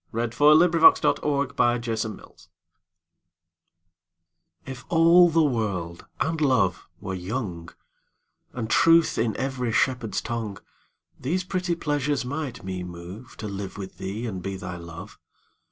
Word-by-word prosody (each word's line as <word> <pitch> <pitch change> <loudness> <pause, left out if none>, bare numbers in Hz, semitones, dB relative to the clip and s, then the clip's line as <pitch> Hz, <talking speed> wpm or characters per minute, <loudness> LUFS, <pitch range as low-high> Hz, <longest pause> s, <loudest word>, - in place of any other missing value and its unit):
Her - - -7
Reply 120 +5 +1
(Written 170 +2 +5
by - - +10
Sir - - +3
Walter 120 -6 0
Raleigh) - - -12 2.3
IF 130 -2 -8
all 170 +1 +6
the 165 0 +3
world 100 - -2
and 160 0 -1
love 115 - +1
were 95 - -5
young, 90 -3 -5 0.8
And 120 -3 -4
truth 165 +7 +4
in 115 -1 0
every 130 -3 -2
shepherd's 125 -2 0
tongue, 110 -4 -4 0.6
These 175 +8 -1
pretty 180 -1 -2
pleasures 145 -4 -1
might 140 -3 -5
me 95 -1 -4
moveTo 90 +6 -9
live 100 -1 -6
with 95 -2 -8
thee 105 +5 -4
and 95 -6 -5
be 95 +1 -5
thy 90 -1 -6
Love. 85 -1 -10
120 Hz, 130 wpm, -25 LUFS, 95-145 Hz, 2.3 s, by